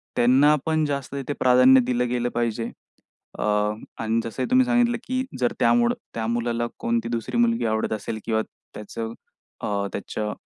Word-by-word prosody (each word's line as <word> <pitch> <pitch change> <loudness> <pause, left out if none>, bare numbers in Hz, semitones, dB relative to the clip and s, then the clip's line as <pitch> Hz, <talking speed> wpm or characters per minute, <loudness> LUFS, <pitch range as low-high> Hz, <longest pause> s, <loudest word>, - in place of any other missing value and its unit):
त्यांना 135 +5 +5
पण 155 -1 +1
जास्त 140 -2 -3
तिथे 140 +1 -3
प्राधान्य 130 +1 +6
दिलं 125 0 0
गेलं 120 0 0
पाहिजे. 115 -1 -1 0.7
अ, - - -1 0.6
अन 115 +1 +1
जसं 115 +3 -4
ही - - -3
तुम्ही 255 0 +5
सांगितलं 240 -1 +2
की 255 0 0 0.2
जर 125 -1 +1
त्यामुडं 120 0 +3 0.2
त्या 110 -1 -2
मुलाला 120 0 -1
कोणती 115 0 -1
दुसरी 120 - -3
मुलगी 235 - +2
आवडत 110 0 0
असेल 110 +1 -4
किंवा 110 -1 +1 0.3
त्याचं 115 +2 -6 0.5
अ, 100 -1 -1
त्याच्या 105 +1 -4
120 Hz, 160 wpm, -24 LUFS, 115-140 Hz, 0.7 s, प्राधान्य